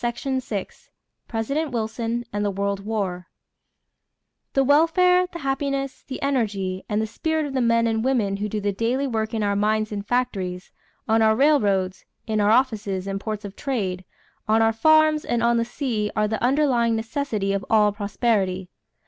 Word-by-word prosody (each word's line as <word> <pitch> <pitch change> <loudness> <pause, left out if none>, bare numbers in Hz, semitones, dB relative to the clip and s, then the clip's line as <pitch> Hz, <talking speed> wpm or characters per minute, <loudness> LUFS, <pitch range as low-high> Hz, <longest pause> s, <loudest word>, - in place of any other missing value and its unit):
CHAPTER 240 +3 -2
XXV 245 -7 -4 0.4
PRESIDENT 275 +8 -2
WILSON 230 +1 -2
AND 205 0 -1
THE 205 - +1
WORLD 200 0 -2
WAR 195 -5 -3 1.3
"The 270 - +3
welfare, 360 +6 +4
the - - -6
happiness, 275 -2 -2
the 260 - -5
energy, 205 -9 -1
and 210 0 0
the 220 - 0
spirit 315 +7 -1
of 280 - -5
the 260 - +1
men 230 -1 +3
and 225 -1 0
women 225 -7 +1
who 210 +1 -3
do 215 - -2
the 205 0 0
daily 235 +7 0
work 220 -4 -2
in 220 - 0
our 200 0 +1
mines 215 +1 +1
and 205 -1 -4
factories, 195 -6 -2 0.4
on 225 0 +3
our 220 0 +4
railroads, 205 -10 +2 0.2
in 215 -2 0
our 205 - +3
offices 215 -6 +1
and 195 0 -3
ports 215 0 -5
of 200 0 -8
trade, 195 -10 -2 0.4
on 220 +1 +4
our 225 0 +3
farms, 310 +5 +4
and 235 -1 -1
on 235 0 +3
the 230 - +2
sea 230 -4 -2
are 215 0 +2
the 220 +1 -3
underlying 250 -4 +2
necessity 220 -3 -2
of 200 -1 -1
all 210 -2 +4
prosperity." 200 -3 -1
225 Hz, 175 wpm, -23 LUFS, 205-260 Hz, 1.3 s, welfare